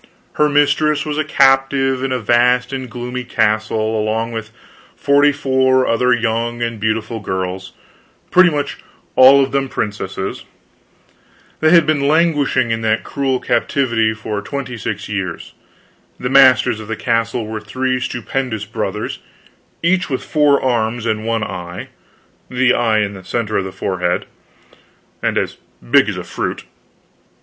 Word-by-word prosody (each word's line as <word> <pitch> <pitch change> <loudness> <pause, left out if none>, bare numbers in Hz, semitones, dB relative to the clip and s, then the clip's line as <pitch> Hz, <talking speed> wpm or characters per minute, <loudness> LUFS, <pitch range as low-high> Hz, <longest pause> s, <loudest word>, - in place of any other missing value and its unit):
Her 150 0 +2
mistress 150 +1 +2
was 150 0 -3
a - - +2
captive 135 -2 +2
in 135 - -1
a 130 - +1
vast 125 +2 +2
and 130 -2 -4
gloomy 125 +2 -5
castle, 110 -1 0
along 110 +2 -1
with 110 -2 -5 0.5
forty 145 +1 +3
four 130 -2 +2
other 125 +2 +2
young 115 0 0
and 115 -2 -3
beautiful 110 +1 -2
girls, 95 -1 -4 0.6
pretty 185 0 +6
much 145 -3 -3 0.4
all 135 +2 +7
of 135 - -3
them 135 -1 -1
princesses; 100 -3 -4 1.2
they 155 - +3
had 170 -1 +6
been 145 -2 +1
languishing 150 -6 +2
in 115 0 -1
that 110 0 0
cruel 135 -2 -1
captivity 120 -7 +1
for 110 -1 -4
twenty 130 +2 -5
six 105 -2 -5
years; 95 -5 -5 0.7
the 125 - -3
masters 130 -5 +5
of 110 - -9
the 115 - -3
castle 115 +1 -1
were 110 0 -5
three 130 +4 -2
stupendous 120 -2 -3
brothers, 110 - -4 0.6
each 180 0 +1
with 130 - -2
four 150 -2 +3
arms 120 -2 0
and 110 -1 -2
one 115 -1 0
eye 90 -2 -7 0.6
the 130 0 +2
eye 110 -3 +2
in 100 -1 -2
the 95 -1 -11
center 110 +2 -3
of 95 - -1
the 95 - -6
forehead, 90 -2 -2 1.0
and - - 0
as - - -2 0.3
big - - +5
as - - -4
a - - -5
fruit. - - -4
120 Hz, 150 wpm, -18 LUFS, 110-135 Hz, 1.2 s, all